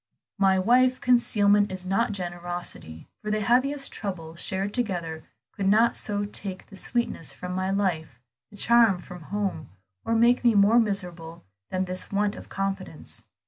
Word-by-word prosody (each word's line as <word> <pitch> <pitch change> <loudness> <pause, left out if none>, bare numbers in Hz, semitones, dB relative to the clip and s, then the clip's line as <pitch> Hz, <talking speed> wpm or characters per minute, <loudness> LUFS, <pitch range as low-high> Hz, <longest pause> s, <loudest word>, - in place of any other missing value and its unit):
"My 190 -1 +4
wife, 250 +6 +3
concealment 205 -5 +3
is 185 -1 -6
not 220 +5 +1
generosity, 175 - -5
for 210 - -5
the 215 0 0
heaviest 270 +6 +1
trouble 165 -6 -6
shared 195 +4 -3
together 175 -9 -3 0.3
could 195 -3 -2
not 220 +4 +4
so 205 -1 -1
take 195 -2 -6
the 200 - -14
sweetness 195 - -2
from 180 +5 -6
my 185 +1 -1
life, 165 -10 -1 0.3
the 205 - -15
charm 230 -3 +5
from 180 0 -11
home, 195 -7 -3 0.3
or 230 - 0
make 240 +2 +4
me 235 -3 +4
more 205 +4 +6
miserable 175 -6 -3 0.3
than 185 0 -1
this 185 0 -3
want 205 0 +1
of - - -11
confidence. 195 - -5
195 Hz, 155 wpm, -26 LUFS, 180-220 Hz, 0.3 s, more